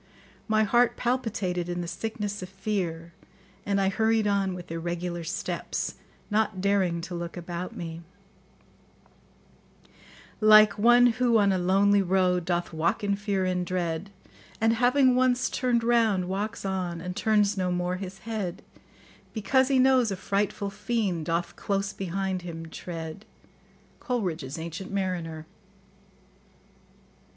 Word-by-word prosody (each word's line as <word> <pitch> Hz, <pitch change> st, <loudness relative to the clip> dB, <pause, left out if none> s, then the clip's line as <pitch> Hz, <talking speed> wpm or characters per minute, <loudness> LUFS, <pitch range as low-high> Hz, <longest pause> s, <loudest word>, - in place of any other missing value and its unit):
My 220 Hz, -1 st, +3 dB
heart 240 Hz, +3 st, +3 dB
palpitated 210 Hz, -8 st, -1 dB
in 175 Hz, 0 st, -2 dB
the 170 Hz, -, -5 dB
sickness 205 Hz, +3 st, -4 dB
of 185 Hz, -, -7 dB
fear, 185 Hz, -4 st, -3 dB, 0.5 s
and 200 Hz, 0 st, +2 dB
I 195 Hz, -1 st, +2 dB
hurried 220 Hz, +1 st, +2 dB
on 200 Hz, -2 st, +1 dB
with 175 Hz, -2 st, -9 dB
irregular 170 Hz, +1 st, -3 dB
steps, 180 Hz, +5 st, -3 dB, 0.4 s
not 210 Hz, -2 st, +1 dB
daring 185 Hz, -3 st, +1 dB
to 175 Hz, +2 st, -7 dB
look 170 Hz, 0 st, -5 dB
about 175 Hz, +1 st, -5 dB
me: 165 Hz, -1 st, -6 dB, 2.4 s
Like 215 Hz, -1 st, +7 dB
one 240 Hz, +3 st, +6 dB
who, 245 Hz, -1 st, +3 dB
on 200 Hz, -2 st, +4 dB
a 190 Hz, -, +1 dB
lonely 195 Hz, +3 st, +4 dB
road, 180 Hz, -2 st, +2 dB
Doth 175 Hz, -1 st, -1 dB
walk 165 Hz, +7 st, 0 dB
in 200 Hz, -1 st, +1 dB
fear 200 Hz, -2 st, -1 dB
and 180 Hz, -1 st, 0 dB
dread, 175 Hz, 0 st, -2 dB, 0.5 s
And, 225 Hz, +1 st, +3 dB
having 250 Hz, +2 st, +4 dB
once 255 Hz, 0 st, +2 dB
turned 245 Hz, -2 st, +1 dB
round, 225 Hz, -6 st, +2 dB
walks 200 Hz, +3 st, -3 dB
on, 185 Hz, -3 st, -2 dB
And 180 Hz, +1 st, -5 dB
turns 210 Hz, -1 st, +2 dB
no 185 Hz, -2 st, -1 dB
more 180 Hz, +1 st, -1 dB
his 190 Hz, 0 st, -7 dB
head; 210 Hz, -4 st, -4 dB, 0.7 s
Because 255 Hz, +5 st, +2 dB
he 270 Hz, -1 st, +2 dB
knows 255 Hz, -2 st, +4 dB
a 195 Hz, -, -2 dB
frightful 200 Hz, +1 st, -1 dB
fiend 200 Hz, -5 st, -2 dB
Doth 170 Hz, +1 st, -1 dB
close 195 Hz, -1 st, -2 dB
behind 190 Hz, 0 st, -2 dB
him 165 Hz, -2 st, -7 dB
tread. 165 Hz, +2 st, -7 dB, 0.8 s
[Coleridge's 170 Hz, -, -3 dB
"Ancient 170 Hz, +4 st, -6 dB
Mariner." 175 Hz, -5 st, -3 dB
195 Hz, 135 wpm, -27 LUFS, 175-215 Hz, 2.4 s, Like